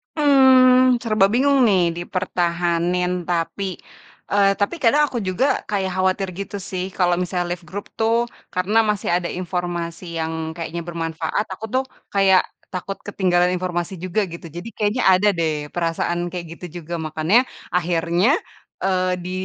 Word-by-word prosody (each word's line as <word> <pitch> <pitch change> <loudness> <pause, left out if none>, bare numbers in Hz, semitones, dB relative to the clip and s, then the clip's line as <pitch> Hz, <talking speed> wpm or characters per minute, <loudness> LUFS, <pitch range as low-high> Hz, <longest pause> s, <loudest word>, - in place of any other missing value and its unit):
Mmm, 255 -3 +6
serba 215 -4 +3
bingung 275 +3 +3
nih 190 -3 +4 0.2
dipertahanin 175 0 0 0.2
tapi, 180 +2 -2 0.6
eee, 200 -1 +4
tapi 205 +11 0
kadang 290 +6 +5
aku 245 - -3
juga 200 +5 0 0.2
kayak 195 -2 -1
khawatir 185 +1 0
gitu 200 +1 -5
sih, 185 -1 -3
kalau 180 -2 +3
misalnya 175 -1 -2
left 175 -1 -5
grup 205 +2 -5
tuh 225 +1 +3 0.4
karena 185 +4 0
masih 210 -2 -1
ada 175 - -3
informasi 175 -1 -3 0.2
yang 160 0 -3
kayaknya 170 0 -4
bermanfaat, 165 +3 -2
aku 215 +4 -7
tuh 260 - +2 0.3
kayak 195 -2 +5 0.3
takut 195 +2 -5
ketinggalan 180 -3 +2
informasi 180 0 -3
juga 185 +4 -1
gitu. 170 0 -9
Jadi, 175 +7 -7
kayaknya 210 +4 0
ada 190 +2 +5
deh 155 -4 -2
perasaan 175 +1 -1
kayak 175 -2 -5
gitu 180 - -7 0.2
juga, 170 +3 -7
makannya 160 +7 +2 0.3
akhirnya, 175 - +2 0.5
eee, 185 -1 +1
di 180 - -5
185 Hz, 145 wpm, -21 LUFS, 175-205 Hz, 0.6 s, Mmm